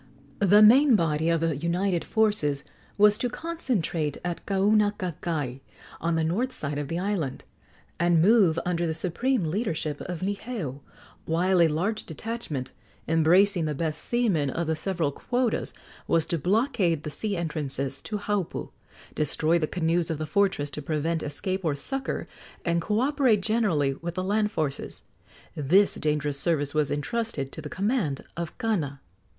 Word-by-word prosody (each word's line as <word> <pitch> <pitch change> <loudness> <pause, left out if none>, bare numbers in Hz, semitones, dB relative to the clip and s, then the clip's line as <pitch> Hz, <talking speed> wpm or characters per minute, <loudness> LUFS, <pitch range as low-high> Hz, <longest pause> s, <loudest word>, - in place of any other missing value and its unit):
The 205 +1 +6
main 255 +4 +7
body 160 -3 +1
of 165 -1 +2
the 165 -2 +1
united 170 +4 0
forces 205 -11 +1 0.3
was 210 +1 +5
to 245 - 0
concentrate 230 - -2
at 175 -1 -3
Kaunakakai, 190 - 0 0.4
on 165 0 0
the 165 - +1
north 215 +11 0
side 145 - -3
of 145 - -3
the 165 - -3
island, 180 -7 -2 0.6
and 170 -1 +4
move 190 -3 +5
under 175 -1 0
the 160 - -2
supreme 200 +8 0
leadership 160 -5 -2
of 175 -3 -5
Niheu, 200 - -3 0.5
while 180 +3 +2
a 165 - +6
large 185 +8 -1
detachment, 160 - -5 0.4
embracing 170 +3 +4
the 150 -1 -2
best 155 +1 -2
seamen 205 - +1
of 170 +5 -2
the 160 0 0
several 165 -3 -1
quotas, 245 - -1 0.4
was 165 -2 +2
to 170 -2 -2
blockade 195 - +1
the 150 - -4
sea 200 +5 -2
entrances 140 -5 -2
to 210 - -4
Haupu, 205 -3 -3 0.4
destroy 155 +2 +1
the 155 - 0
canoes 170 0 0
of 160 - -1
the 155 - -3
fortress 155 -4 +1
to 150 - -5
prevent 160 +2 -1
escape 185 +6 -3
or 155 -4 +1
succor, 270 - -4 0.4
and 170 0 +1
co 210 +6 0
operate 265 -6 +3
generally 190 -11 +1
with 170 +5 -6
the 185 - -1
land 210 +2 +1
forces. 150 -7 -3 0.5
This 180 +8 +4
dangerous 150 -2 -1
service 145 -3 0
was 150 -2 +1
entrusted 145 - -2
to - - -7
the 150 - -7
command 195 - -1
of 170 -1 -5
Kana. 160 -12 -1
170 Hz, 155 wpm, -26 LUFS, 155-210 Hz, 0.6 s, main